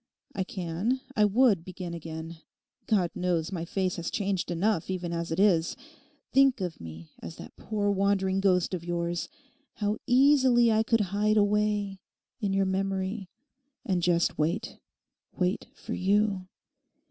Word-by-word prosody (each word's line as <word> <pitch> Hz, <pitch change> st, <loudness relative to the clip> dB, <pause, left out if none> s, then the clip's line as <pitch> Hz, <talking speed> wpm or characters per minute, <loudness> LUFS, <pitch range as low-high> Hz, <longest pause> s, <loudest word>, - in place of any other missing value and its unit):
I 190 Hz, -, -1 dB
can, 185 Hz, +7 st, -2 dB, 0.2 s
I 210 Hz, -, +5 dB
would 210 Hz, -4 st, +3 dB
begin 180 Hz, -1 st, -7 dB
again. 165 Hz, 0 st, -7 dB, 0.5 s
God 190 Hz, -6 st, +2 dB
knows 175 Hz, -1 st, -1 dB
my 170 Hz, -3 st, -3 dB
face 185 Hz, +1 st, -1 dB
has 170 Hz, -1 st, -3 dB
changed 195 Hz, -3 st, -1 dB
enough 175 Hz, +1 st, 0 dB
even 180 Hz, -2 st, -3 dB
as 170 Hz, 0 st, -3 dB
it 165 Hz, -, -1 dB
is. 175 Hz, -5 st, +3 dB, 0.6 s
Think 270 Hz, -2 st, +5 dB
of 180 Hz, -4 st, -4 dB
me 80 Hz, 0 st, -10 dB
as -, -, -7 dB
that -, -, -11 dB
poor 205 Hz, -2 st, -1 dB
wandering 195 Hz, -1 st, +1 dB
ghost 185 Hz, -2 st, +2 dB
of 175 Hz, -2 st, -3 dB
yours; 170 Hz, 0 st, -2 dB, 0.5 s
how 210 Hz, 0 st, -1 dB
easily 255 Hz, -2 st, +5 dB
I 220 Hz, 0 st, +3 dB
could 225 Hz, 0 st, +2 dB
hide 210 Hz, +1 st, +2 dB
away—in 205 Hz, 0 st, -1 dB
your 195 Hz, 0 st, +2 dB
memory; 190 Hz, +1 st, -2 dB, 0.6 s
and 185 Hz, -2 st, 0 dB
just 170 Hz, -2 st, +1 dB
wait, 155 Hz, +3 st, -1 dB, 0.6 s
wait 180 Hz, 0 st, 0 dB
for -, -, -7 dB
you. 195 Hz, -1 st, +1 dB
190 Hz, 145 wpm, -28 LUFS, 175-210 Hz, 0.6 s, I